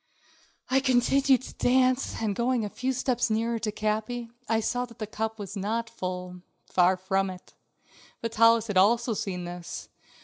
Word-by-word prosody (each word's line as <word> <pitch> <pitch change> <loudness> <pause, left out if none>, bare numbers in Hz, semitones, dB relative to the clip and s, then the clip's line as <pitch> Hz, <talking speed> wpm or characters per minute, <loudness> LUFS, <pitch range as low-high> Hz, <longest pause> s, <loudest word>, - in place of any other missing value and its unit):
I 265 - +5
continued 265 0 +3
to - - -9
dance, 255 +1 +2
and 205 -2 0
going 240 -1 +1
a - - -4
few 260 +1 -1
steps 250 -2 0
nearer 230 +1 0
Capi, 220 +2 -2 0.2
I 225 -1 +3
saw 245 +3 -1
that 235 -2 -16
the 215 - -3
cup 220 +1 -3
was 205 0 -7
not 225 +4 -2
full; 180 -3 -5 0.2
far 185 +1 +3
from 190 +1 0
it. 185 -1 -11 0.7
Vitalis 230 0 +4
had 205 -4 -1
also 230 +5 +4
seen 185 -3 -3
this. 175 0 -7
225 Hz, 160 wpm, -27 LUFS, 195-245 Hz, 0.7 s, I